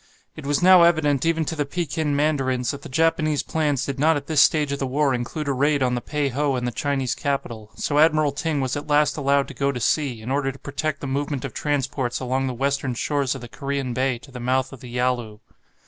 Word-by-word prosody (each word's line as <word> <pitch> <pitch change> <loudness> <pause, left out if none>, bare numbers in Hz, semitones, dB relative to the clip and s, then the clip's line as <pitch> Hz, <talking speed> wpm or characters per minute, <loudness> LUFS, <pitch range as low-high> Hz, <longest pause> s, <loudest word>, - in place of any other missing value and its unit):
It 150 -3 -8
was 145 +4 +1
now 185 -1 +8
evident 160 -4 +3
even 165 -1 +1
to 160 - -3
the 150 - 0
Pekin 155 -1 -2
mandarins 135 -4 +1
that 140 - -8
the - - -10
Japanese 155 +1 +1
plans 145 -4 0
did 135 -1 -4
not 160 +1 +4
at 140 - -6
this 155 -2 +3
stage 150 -2 +3
of 140 - -2
the 135 - -1
war 140 +1 +1
include 125 +5 -3
a 140 - +1
raid 140 +1 +2
on 125 -1 +1
the 120 - -1
Pei 150 0 -1
ho 140 +1 0
and 125 -1 -2
the 120 - -1
Chinese 135 -1 -1
capital, 115 -6 -3
so 145 +6 0
Admiral 155 -2 +4
Ting 145 0 -2
was 130 -1 -1
at 145 +1 -5
last 150 0 +3
allowed 140 -1 +1
to - - -8
go 140 0 0
to 125 - -5
sea, 130 -1 0
in 125 - -4
order 135 0 0
to 135 - -13
protect 140 +1 -3
the - - -4
movement 140 0 -2
of - - -6
transports 135 -4 -1
along 130 +1 -1
the 130 - -3
western 135 0 -1
shores 140 +1 0
of 135 - -7
the 120 - -8
Korean 140 -1 -3
Bay 130 0 0
to 135 +4 -16
the 125 - -8
mouth 130 +2 0
of 135 - -10
the 125 - -10
Yalu. 120 -3 -1
140 Hz, 245 wpm, -23 LUFS, 130-150 Hz, -, now